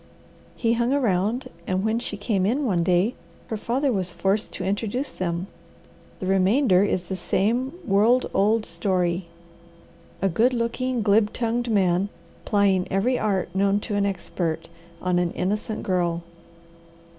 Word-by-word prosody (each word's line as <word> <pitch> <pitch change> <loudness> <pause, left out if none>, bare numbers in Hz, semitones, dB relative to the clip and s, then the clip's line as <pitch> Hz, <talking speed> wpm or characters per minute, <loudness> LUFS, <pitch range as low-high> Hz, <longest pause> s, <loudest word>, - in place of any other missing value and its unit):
He 230 -1 +1
hung 235 +1 +1
around 225 -2 +1 0.2
and 185 +2 0
when 220 +1 +1
she 210 -4 -5
came 205 -2 0
in 255 +9 +1
one 180 -7 +1
day 180 +6 +2 0.4
her 220 - -2
father 255 +6 0
was 185 -3 -1
forced 195 +4 0
to - - -5
introduce 220 +8 -2
them. 170 0 -3 0.7
The - - -5
remainder 195 +2 +4
is 185 -3 0
the 190 +2 -4
same 230 - 0
world 225 +5 +4
old 215 +3 +2
story 175 0 0 0.9
a 195 - +2
good 230 +8 +2
looking, 240 +1 -1
glib 210 0 +3
tongued 240 0 -1
man, 190 -2 +2 0.4
plying 195 -3 +2
every 235 +7 +1
art 190 -4 -1
known 200 +1 +2
to 205 - -3
an 200 0 +2
expert, 175 -4 -3 0.3
on 180 -1 +2
an 175 -1 +1
innocent 210 +4 -2
girl." 175 -2 0
200 Hz, 145 wpm, -24 LUFS, 185-230 Hz, 0.9 s, remainder